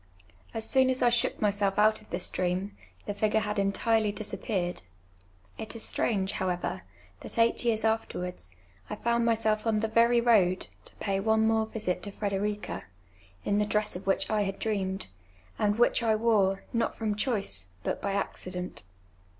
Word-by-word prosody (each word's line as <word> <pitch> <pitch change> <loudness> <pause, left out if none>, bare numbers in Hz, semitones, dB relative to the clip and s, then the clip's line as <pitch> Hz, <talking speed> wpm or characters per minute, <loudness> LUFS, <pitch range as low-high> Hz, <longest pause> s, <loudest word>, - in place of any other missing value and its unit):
As 225 0 -2
soon 260 -1 +4
as 260 -1 +1
I 240 - +6
shook 235 0 +1
myself 200 -2 +1
out 215 +1 +4
of 215 - -20
this 175 +1 -3
dream, 185 +2 -1 0.3
the 205 - -2
fipn 215 +1 0
e - - +6
had 210 -1 -1
entirely 210 +2 +2
disappeared. 200 -3 -3 0.8
It 220 +1 -5
is 230 - -6
strange, 195 -3 0
however, 180 - -2 0.4
that - - -5
ei<::lit 230 +1 +4
years 225 -2 +1
afterwards. 180 - -2 0.3
I - - -3
found 235 +2 +1
myself 220 -1 +1
on 215 -1 +2
the 220 - 0
very 235 +2 +4
road, 205 -6 +3 0.2
to - - -13
pay 195 -1 -1
one 220 +2 +3
more 220 0 +2
visit 210 -5 -2
to 205 - -4
Trederica, 205 +1 -3 0.6
in 205 - +2
tlu' 210 0 0
dress 210 -2 0
of 180 - -7
wliicli 195 +2 +1
I 215 -1 +2
had 195 -1 -2
dreamed, 195 -3 -2 0.5
and 210 0 +2
which 240 +1 +3
I 225 -2 +3
wore, 210 -4 +2
not 230 -1 0
from 220 -2 -1
choice, 200 - -1 0.2
but - - -2
by 200 - -1
accident. 185 -2 -3
210 Hz, 175 wpm, -29 LUFS, 195-225 Hz, 0.8 s, I